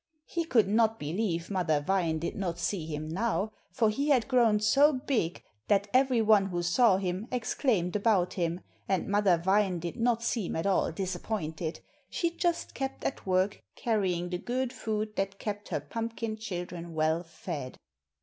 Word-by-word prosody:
He 335 -1 -2
could 230 - +3
not 220 +2 +3
believe 170 +1 -2
Mother 175 -6 +1
Vine 170 0 +1
did 165 +2 -3
not 180 -4 -2
see 175 -1 -2
him 155 -1 -4
now, 215 +4 -1 0.2
for 220 -3 +2
he 280 +7 -1
had 255 -5 +3
grown 235 -5 +4
so 275 +8 +5
big 255 -10 -1 0.2
that 200 0 +3
every 255 -3 +4
one 210 -2 +5
who 175 -2 -2
saw 190 +3 +4
him 190 +3 -3
exclaimed 220 - 0
about 200 -4 +2
him, 170 -1 -1 0.3
and 190 -2 +1
Mother 200 -3 +3
Vine 190 +1 +2
did 170 +4 -5
not 235 -1 +1
seem 230 -5 -1
at 165 - -2
all 195 -3 +2
disappointed, 175 -3 -3 0.3
she 340 -1 0
just 340 0 -1
kept 270 0 -4
at 270 - -3
work 185 +2 +1
carrying 185 -6 0
the 180 - -2
good 255 +3 -2
food 215 -3 -3
that 195 0 -1
kept 205 0 -5
her - - -1
pumpkin 225 +8 -4
children 175 -5 -6
well 160 +1 +2
fed. 160 -5 -6
200 Hz, 170 wpm, -29 LUFS, 175-230 Hz, 0.3 s, so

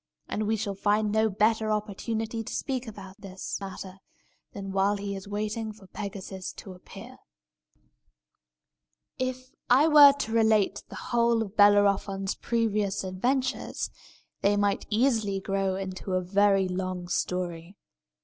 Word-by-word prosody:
And 210 0 -2
we 220 - +2
shall 205 -2 -3
find 210 +2 +1
no 220 +1 +2
better 215 +2 +1
opportunity 220 +2 -3
to - - -6
speak 260 -2 -3
about 195 -3 -10
this 190 -1 -6
matter 190 -1 -8 0.5
than 195 -1 -6
while 195 +1 +2
he 200 0 -4
is 195 0 -8
waiting 215 +2 -3
for 210 -2 -15
Pegasus 190 -1 -7
to 190 - -10
appear. 180 - -12 2.0
If 255 0 -3 0.2
I 265 +6 +6
were 295 -2 +9
to 275 -6 -4
relate 220 -3 +3
the - - -9
whole 235 -1 +1
of 205 -1 -10
Bellerophon's 200 -1 +3
previous 210 -4 -1
adventures, 250 +8 -1 0.5
they 205 +1 +3
might 205 0 0
easily 220 -4 +1
grow 195 -1 -1
into 190 0 -5
a 185 - +2
very 195 +1 +3
long 185 -1 -3
story. 180 +1 -3
205 Hz, 135 wpm, -27 LUFS, 195-220 Hz, 2.0 s, were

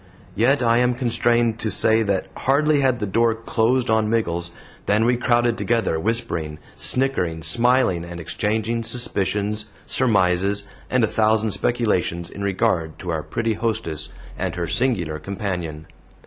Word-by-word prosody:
Yet 125 +6 +2
I 115 0 +3
am 125 0 +2
constrained 120 -2 +1
to 110 - -1
say 110 +2 +3
that 100 -3 0
hardly 145 +3 +2
had 130 -3 +2
the 105 - -3
door 115 +3 +2
closed 115 +2 0
on 110 -1 +2
Miggles 85 -7 -1 0.4
than 105 +2 +3
we 125 +1 +3
crowded 120 -1 +1
together, 115 -9 0
whispering, 85 -8 -2 0.2
snickering, 95 - 0
smiling, 120 -7 +2
and 85 0 -8
exchanging 110 +6 -1
suspicions, 105 -2 0 0.2
surmises, 100 -3 +2 0.2
and 125 -2 +2
a - - +4
thousand 110 0 +1
speculations 95 -8 -1
in 100 - -7
regard 95 -5 0
to 90 - -5
our 80 -1 -1
pretty 115 +7 -2
hostess 105 -9 -2 0.3
and 90 -2 -2
her 90 -1 -2
singular 90 -9 -1
companion. 90 -4 -5
110 Hz, 145 wpm, -22 LUFS, 90-120 Hz, 0.4 s, a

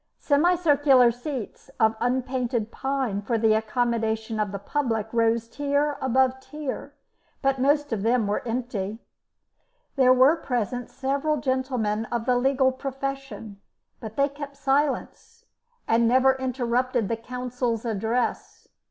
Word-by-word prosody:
Semicircular 290 -5 +4
seats 245 0 -7
of 220 -1 +3
unpainted 245 -2 -1
pine 265 -7 -2
for 230 +3 -1
the 220 -1 +3
accommodation 220 0 -1
of 210 -2 -1
the 200 - -4
public 225 0 -2
rose 230 0 +2
tier 285 +3 0
above 260 0 +2
tier, 295 0 -6 0.5
but 270 -1 +1
most 290 0 +2
of 210 - -2
them 230 +1 +2
were 205 +1 -1
empty. 225 -4 -3 1.0
There 255 -1 +5
were 260 +6 +5
present 245 -4 -3
several 280 +3 -1
gentlemen 250 -5 -1
of 235 0 -3
the 250 - +2
legal 260 +1 +3
profession, 270 -5 -6 0.4
but 220 -1 -8
they 280 0 +3
kept 285 0 -9
silence, 290 - -1 0.4
and 230 +1 +3
never 260 +2 +5
interrupted 255 -2 -1
the 230 - -1
counsel's 250 -1 -3
address. 225 +2 -2
250 Hz, 125 wpm, -25 LUFS, 225-275 Hz, 1.0 s, There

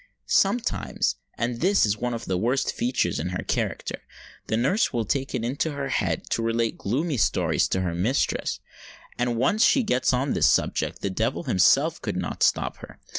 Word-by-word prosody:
Sometimes—and 195 - 0
this 195 - +4
is 105 -1 +1
one 120 +2 -2
of 115 - -6
the 95 - -1
worst 125 +6 0
features 120 -8 0
in - - -2
her 90 - -4
character—the 110 - -4
nurse 140 - +2
will 115 -3 -1
take 135 +5 -2
it 115 - -2
into 140 +5 -1
her 140 -1 -4
head 95 -10 -1
to - - +1
relate 115 0 0
gloomy 140 - -1
stories 105 - +2
to 95 - -1
her 90 -2 -1
mistress; 105 +11 0 0.6
and 125 0 +1
when 120 - -2
once 200 - +2
she 265 -1 +4
gets 130 - +1
on 130 +2 0
this - - +3
subject, - - 0
the 100 - -2
devil 95 - -1
himself 90 - +3
could - - -3
not - - -4
stop - - +2
her. - - -12
120 Hz, 180 wpm, -25 LUFS, 110-140 Hz, 0.6 s, this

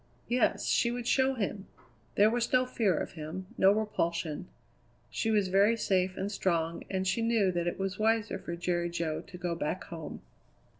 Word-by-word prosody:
Yes, 245 +1 +2
she 235 - +3
would 240 0 -4
show 265 +2 +3
him! 200 -3 -3 0.5
There 210 +2 +5
was 235 0 0
no 255 0 +4
fear 215 -8 +1
of - - -3
him; 160 +4 -6
no 190 - +5
repulsion. 170 -6 -1 0.6
She 225 - -1
was 205 -4 +2
very 200 +4 +4
safe 185 -3 +1
and 195 +2 -2
strong, 170 -4 -1
and 190 -1 -1
she 190 +5 +1
knew 225 -4 +2
that 175 -1 -1
it 175 - -1
was 195 0 -3
wiser 220 -2 +1
for 170 - -5
Jerry 175 0 -1
Jo 165 -2 -2
to 180 - -11
go 175 -1 -2
back 165 +2 -2
home. 165 -2 -8
190 Hz, 185 wpm, -30 LUFS, 175-220 Hz, 0.6 s, There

